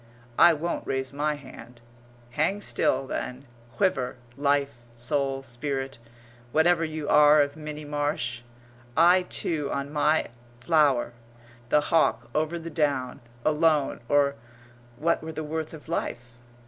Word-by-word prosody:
I 175 Hz, -, +8 dB
won't 160 Hz, +3 st, -3 dB
raise 135 Hz, 0 st, -2 dB
my 150 Hz, +1 st, 0 dB
hand. 125 Hz, -4 st, -12 dB, 0.5 s
Hang 160 Hz, +10 st, 0 dB
still, 135 Hz, -8 st, 0 dB
then, 130 Hz, +1 st, -5 dB, 0.3 s
quiver, 135 Hz, -11 st, 0 dB, 0.2 s
life, 140 Hz, 0 st, +1 dB, 0.2 s
soul, 135 Hz, +2 st, -1 dB
spirit, 135 Hz, +1 st, -4 dB, 0.5 s
whatever 165 Hz, +3 st, +3 dB
you 155 Hz, -2 st, -4 dB
are 150 Hz, 0 st, +6 dB
of 145 Hz, 0 st, -5 dB
Minnie 150 Hz, -1 st, -7 dB
Marsh 145 Hz, -5 st, -2 dB, 0.6 s
I, 175 Hz, +3 st, +6 dB
too, 150 Hz, -4 st, -2 dB
on 140 Hz, +1 st, -3 dB
my 150 Hz, +1 st, +2 dB, 0.3 s
flower 140 Hz, -4 st, +2 dB, 0.6 s
the 150 Hz, -, +4 dB
hawk 165 Hz, +1 st, +1 dB
over 155 Hz, +2 st, 0 dB
the 165 Hz, 0 st, -7 dB
down 140 Hz, -5 st, -1 dB, 0.3 s
alone, 155 Hz, -2 st, +2 dB
or 140 Hz, -1 st, +3 dB, 0.6 s
what 165 Hz, +5 st, +1 dB
were 160 Hz, 0 st, -6 dB
the 155 Hz, 0 st, -4 dB
worth 155 Hz, +1 st, -4 dB
of 160 Hz, -1 st, -12 dB
life? 120 Hz, -7 st, -4 dB
150 Hz, 130 wpm, -26 LUFS, 135-155 Hz, 0.6 s, I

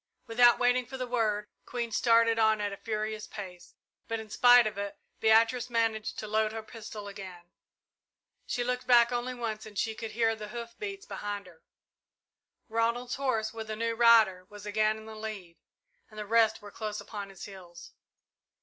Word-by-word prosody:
Without 240 Hz, +1 st, +5 dB
waiting 245 Hz, 0 st, +2 dB
for 265 Hz, -, -7 dB
the 255 Hz, -, -3 dB
word, 220 Hz, -4 st, 0 dB, 0.2 s
Queen 235 Hz, -2 st, -3 dB
started 230 Hz, 0 st, +4 dB
on 220 Hz, -1 st, +4 dB
at 205 Hz, -1 st, -2 dB
a -, -, -7 dB
furious 215 Hz, 0 st, -3 dB
pace, 185 Hz, -4 st, -9 dB, 0.3 s
but 225 Hz, 0 st, -2 dB
in 220 Hz, -1 st, -10 dB
spite 245 Hz, 0 st, +7 dB
of 215 Hz, -, -2 dB
it, 200 Hz, 0 st, -5 dB, 0.2 s
Beatrice 230 Hz, +3 st, +4 dB
managed 225 Hz, -2 st, 0 dB
to 215 Hz, -, -5 dB
load 215 Hz, 0 st, +1 dB
her 225 Hz, -1 st, -5 dB
pistol 215 Hz, -2 st, -9 dB
again. 185 Hz, -3 st, -10 dB, 1.0 s
She 245 Hz, -, -1 dB
looked 250 Hz, 0 st, -2 dB
back 240 Hz, -1 st, +6 dB
only 245 Hz, +1 st, -2 dB
once, 225 Hz, -3 st, -4 dB
for 215 Hz, -1 st, -11 dB
she 220 Hz, +2 st, 0 dB
could 220 Hz, 0 st, -7 dB
hear 225 Hz, 0 st, +2 dB
the 215 Hz, -1 st, -7 dB
hoof 235 Hz, +1 st, -7 dB
beats 395 Hz, -1 st, -6 dB
behind 205 Hz, -, -5 dB
her. 170 Hz, -3 st, -17 dB, 1.1 s
Ronald's 235 Hz, +2 st, -1 dB
horse, 230 Hz, -5 st, -1 dB
with 220 Hz, -1 st, -7 dB
a 215 Hz, -, -2 dB
new 230 Hz, +1 st, -1 dB
rider, 225 Hz, -6 st, +5 dB
was 205 Hz, -1 st, -11 dB
again 215 Hz, +1 st, +1 dB
in 220 Hz, -, -11 dB
the 220 Hz, -, -9 dB
lead, 215 Hz, -6 st, -7 dB, 0.5 s
and 215 Hz, -, -15 dB
the 210 Hz, -, -4 dB
rest 220 Hz, 0 st, +3 dB
were 205 Hz, -, -10 dB
close 215 Hz, -1 st, -4 dB
upon 205 Hz, -2 st, -7 dB
his 195 Hz, -2 st, -9 dB
heels. 185 Hz, -4 st, -12 dB
220 Hz, 185 wpm, -29 LUFS, 210-235 Hz, 1.1 s, spite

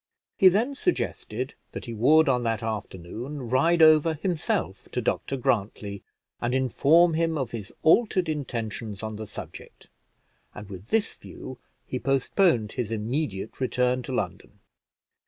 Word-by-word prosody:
He 190 Hz, -, +7 dB
then 225 Hz, +9 st, +1 dB
suggested 130 Hz, -, -2 dB, 0.2 s
that -, -, -6 dB
he 115 Hz, -, -6 dB
would 150 Hz, +8 st, +5 dB
on 125 Hz, -2 st, +3 dB
that 115 Hz, -2 st, -1 dB
afternoon 110 Hz, -, -5 dB
ride 165 Hz, +6 st, +4 dB
over 155 Hz, 0 st, +6 dB
himself 165 Hz, +1 st, -2 dB
to -, -, 0 dB
Dr 135 Hz, -, -1 dB
Grantly, 100 Hz, -4 st, -1 dB, 0.4 s
and 120 Hz, +2 st, 0 dB
inform 150 Hz, +6 st, +4 dB
him 165 Hz, 0 st, +1 dB
of 130 Hz, -5 st, -2 dB
his 110 Hz, -2 st, -6 dB
altered 185 Hz, +1 st, +4 dB
intentions 115 Hz, -8 st, -4 dB
on 110 Hz, -1 st, -4 dB
the 110 Hz, 0 st, -6 dB
subject, -, -, -10 dB, 0.7 s
and 105 Hz, -1 st, -9 dB
with 95 Hz, +2 st, -9 dB
this 225 Hz, -1 st, +1 dB
view, 130 Hz, -1 st, -10 dB, 0.3 s
he 125 Hz, -, -4 dB
postponed 135 Hz, -, +2 dB
his 120 Hz, -4 st, -3 dB
immediate 110 Hz, 0 st, -3 dB
return 125 Hz, 0 st, +1 dB
to -, -, -6 dB
London. -, -, -4 dB
130 Hz, 140 wpm, -26 LUFS, 110-160 Hz, 0.7 s, He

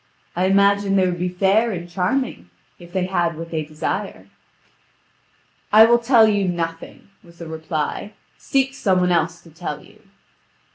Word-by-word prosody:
I 180 Hz, +2 st, +1 dB
imagine 200 Hz, +1 st, +3 dB
they 190 Hz, -1 st, +3 dB
would 175 Hz, -1 st, -2 dB
be 180 Hz, +1 st, -1 dB
fair 195 Hz, +5 st, +2 dB
and 175 Hz, -3 st, -5 dB
charming, 180 Hz, -, -2 dB, 0.3 s
if 175 Hz, -1 st, -14 dB
they 185 Hz, 0 st, -1 dB
had 170 Hz, -3 st, -1 dB
what 165 Hz, +1 st, -8 dB
they 160 Hz, -1 st, -1 dB
desire." 155 Hz, +1 st, -5 dB, 1.4 s
"I 220 Hz, +1 st, +8 dB
will 235 Hz, +1 st, +4 dB
tell 235 Hz, -2 st, +5 dB
you 205 Hz, -3 st, +1 dB
nothing," 165 Hz, +1 st, -5 dB
was 170 Hz, -1 st, -19 dB
the 170 Hz, -, -9 dB
reply; 160 Hz, +5 st, -4 dB, 0.2 s
"seek 270 Hz, 0 st, -1 dB
some 190 Hz, -8 st, +1 dB
one 180 Hz, 0 st, +1 dB
else 170 Hz, 0 st, 0 dB
to 165 Hz, -, -18 dB
tell 160 Hz, -2 st, -6 dB
you." -, -, -21 dB
180 Hz, 160 wpm, -21 LUFS, 170-200 Hz, 1.4 s, I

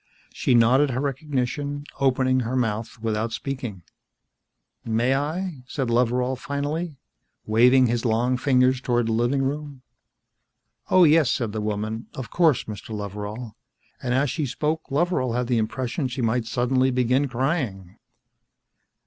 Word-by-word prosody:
She 125 Hz, -, +2 dB
nodded 125 Hz, +5 st, +5 dB
her 130 Hz, 0 st, -2 dB
recognition, 140 Hz, 0 st, -2 dB, 0.2 s
opening 130 Hz, -1 st, +2 dB
her 125 Hz, +1 st, -2 dB
mouth 115 Hz, -3 st, -1 dB
without 110 Hz, 0 st, -1 dB
speaking. 125 Hz, -10 st, -5 dB, 1.0 s
"May 115 Hz, +3 st, +1 dB
I?" 155 Hz, +2 st, -2 dB
said 130 Hz, -3 st, -2 dB
Loveral 125 Hz, +2 st, +1 dB
finally, 145 Hz, +4 st, -3 dB, 0.5 s
waving 125 Hz, +4 st, +5 dB
his 120 Hz, -1 st, 0 dB
long 120 Hz, +2 st, +1 dB
fingers 130 Hz, -1 st, +2 dB
toward 120 Hz, -2 st, +1 dB
the 115 Hz, -, -1 dB
living 120 Hz, +5 st, +1 dB
room. 140 Hz, -1 st, -4 dB, 1.1 s
"Oh, 185 Hz, -, +6 dB
yes," 155 Hz, -4 st, +5 dB
said 115 Hz, -5 st, -1 dB
the 110 Hz, 0 st, -3 dB
woman. 110 Hz, +2 st, -3 dB
"Of 130 Hz, -3 st, -6 dB
course, 165 Hz, -7 st, +3 dB
Mr. 105 Hz, -1 st, -8 dB
Loveral." 105 Hz, +3 st, -6 dB, 0.5 s
And 125 Hz, -1 st, -1 dB
as 135 Hz, 0 st, +2 dB
she 150 Hz, -1 st, -2 dB
spoke 155 Hz, +5 st, -2 dB
Loveral 140 Hz, -4 st, 0 dB
had 125 Hz, +1 st, 0 dB
the 120 Hz, -1 st, +1 dB
impression 130 Hz, +5 st, -2 dB
she 125 Hz, 0 st, -4 dB
might 115 Hz, +1 st, +1 dB
suddenly 130 Hz, +2 st, +1 dB
begin 125 Hz, +2 st, +2 dB
crying. 120 Hz, -, -2 dB
125 Hz, 140 wpm, -24 LUFS, 115-140 Hz, 1.1 s, Oh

